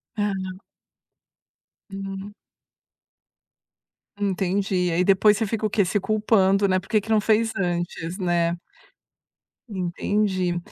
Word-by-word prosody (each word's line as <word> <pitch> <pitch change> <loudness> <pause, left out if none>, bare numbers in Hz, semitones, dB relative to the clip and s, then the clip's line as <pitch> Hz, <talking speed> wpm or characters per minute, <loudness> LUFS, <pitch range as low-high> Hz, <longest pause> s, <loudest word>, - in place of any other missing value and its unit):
Ah. 205 -1 0 1.6
Hum. 195 +1 -6 1.9
Entendi. 190 -2 0
Aí 175 +2 +2
depois 200 +2 +4
você 225 - 0
fica 220 +1 -2
o - - +1
quê; 200 -2 +2
se 205 +3 0
culpando, 200 -2 +2
né, 185 0 +2
por 190 - -16
que 215 - +3
que 220 - -11
não 215 -1 +3
fez 225 +1 +2
antes, 175 -1 -2
né. 175 -2 0 1.1
Entendi. 185 -1 -1
195 Hz, 110 wpm, -24 LUFS, 180-210 Hz, 1.9 s, depois